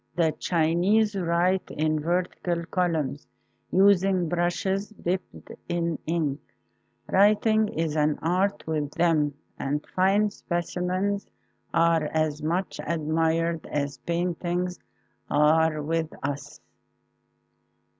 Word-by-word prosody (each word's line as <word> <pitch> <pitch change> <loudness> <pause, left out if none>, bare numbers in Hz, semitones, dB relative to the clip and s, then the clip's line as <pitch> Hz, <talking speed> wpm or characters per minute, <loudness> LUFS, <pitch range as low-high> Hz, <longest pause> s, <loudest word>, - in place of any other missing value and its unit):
The 165 -2 +3
Chinese 180 +6 +2
write 180 +1 +1
in 155 0 0
vertical 175 +1 -1
columns 160 -6 -1 0.4
using 190 -2 +4
brushes 175 +4 -1
dipped 185 -3 -5 0.2
in 170 -2 -1
ink. 155 -4 0 0.7
Writing 215 +2 +4
is 160 -5 -2
an 150 -1 +2
art 190 +4 +1
with 155 -2 -1
them 155 -4 +2 0.2
and 145 +2 -2
fine 200 +3 +3
specimens 185 +3 -2 0.4
are 165 -2 +3
as 155 -1 0
much 175 +5 -2
admired 165 +1 0
as 140 -1 -3
paintings 175 +1 -2 0.5
are 155 +1 +3
with 160 +1 -1
us. 145 +1 -4
170 Hz, 95 wpm, -26 LUFS, 155-185 Hz, 0.7 s, using